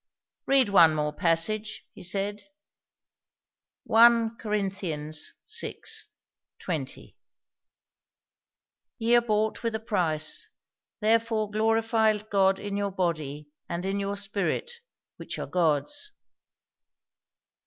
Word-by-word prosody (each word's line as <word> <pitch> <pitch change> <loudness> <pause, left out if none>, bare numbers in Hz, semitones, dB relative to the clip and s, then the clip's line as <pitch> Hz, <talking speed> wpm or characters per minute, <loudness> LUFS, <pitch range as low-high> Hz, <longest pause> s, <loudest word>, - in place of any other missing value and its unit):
"Read 270 -3 +4
one 170 -6 +6
more 150 0 -1
passage," 200 +6 0
he - - -12
said. 200 +3 -2 1.4
"1 230 0 +5
Cor 215 - -6
vi. 185 -7 -3 1.6
20." - - -5 1.8
"'Ye 235 +1 +3
are 240 - +6
bought 215 -1 0
with 230 -2 -1
a - - -1
price; 170 -9 -1 0.5
therefore 220 -1 +1
glorify 220 0 +2
God 195 -2 +2
in 200 0 -5
your 200 0 0
body 155 -5 -3 0.2
and 170 +2 -3
in 195 +1 -1
your 200 0 -2
spirit, 200 - -2 0.5
which - - -6
are - - -4
God's.' 180 - 0
205 Hz, 100 wpm, -27 LUFS, 175-225 Hz, 1.8 s, one